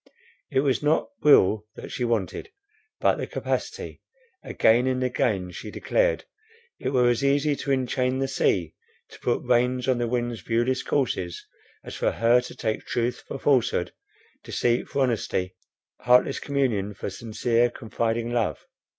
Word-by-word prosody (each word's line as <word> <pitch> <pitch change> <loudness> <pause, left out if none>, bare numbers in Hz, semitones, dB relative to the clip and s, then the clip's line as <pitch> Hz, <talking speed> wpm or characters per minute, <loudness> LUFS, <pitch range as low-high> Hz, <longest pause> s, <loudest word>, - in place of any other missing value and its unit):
It 135 - +2
was 135 -2 +1
not 150 +2 +1
will 110 -7 +5
that - - -9
she 125 - -3
wanted, 115 - -1 0.5
but - - +3
the - - -4
capacity; - - -4 0.4
again 120 +3 +3
and 130 0 0
again 105 -7 0
she - - -8
declared, - - 0 0.5
it - - -2
were 125 -2 +3
as 120 +2 +1
easy 140 +1 +2
to 140 - -3
enchain 130 0 0
the 135 0 0
sea, 95 - 0 0.4
to - - -14
put - - -1
reins 125 +1 +1
on 130 -2 +2
the 120 - 0
wind's 120 -1 -2
viewless 120 +3 0
courses, 95 -11 -2 0.4
as - - -8
for - - 0
her 120 +2 +4
to 125 - -9
take 110 -2 -3
truth 120 +1 -1
for - - -5
falsehood, 135 -3 +1 0.5
deceit 120 0 0
for 140 - +1
honesty, 100 -6 -1 0.4
heartless 125 +1 +3
communion 115 -8 -1
for 100 - -5
sincere, 115 +3 0
confiding 115 0 -2
love. 120 -2 -1
120 Hz, 150 wpm, -25 LUFS, 115-130 Hz, 0.5 s, will